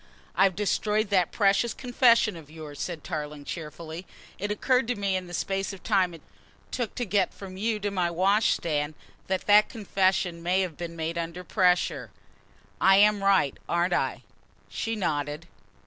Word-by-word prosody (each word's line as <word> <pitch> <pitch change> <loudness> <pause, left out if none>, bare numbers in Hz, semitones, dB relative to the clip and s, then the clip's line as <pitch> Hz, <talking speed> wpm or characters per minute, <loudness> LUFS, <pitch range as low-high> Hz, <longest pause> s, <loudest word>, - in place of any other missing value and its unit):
"I've 190 -1 +4
destroyed 210 +1 0
that 185 -4 +3
precious 205 +2 +2
confession 235 -4 +3
of 160 -3 -12
yours," 155 -2 -9
said 170 -4 -4
Tarling 150 -3 -5
cheerfully. 160 +2 -7 0.3
"It 205 +2 -2
occurred 250 +4 +1
to 245 - 0
me 200 -1 -1
in 185 -1 -3
the 175 - -10
space 195 +1 -2
of 195 - -11
time 185 -5 +2
it 165 - -15 0.5
took 240 -4 -3
to 245 - -2
get 200 -1 +1
from 190 -2 -9
you 215 +2 -1
to 205 0 -1
my 180 -3 0
wash 195 +5 +3
stand, 150 -2 -2 0.3
that 190 -1 -1
that 210 +1 +6
confession 190 -5 0
may 180 +3 +2
have 180 -5 -3
been 170 0 -6
made 165 +1 -3
under 170 +2 -5
pressure. 180 -1 +1 0.7
I 195 0 +6
am 205 0 +4
right, 195 -8 +3
aren't 175 +1 +1
I?" - - -1 0.5
She 225 0 -3
nodded. 150 -4 -2
185 Hz, 170 wpm, -27 LUFS, 170-205 Hz, 0.7 s, that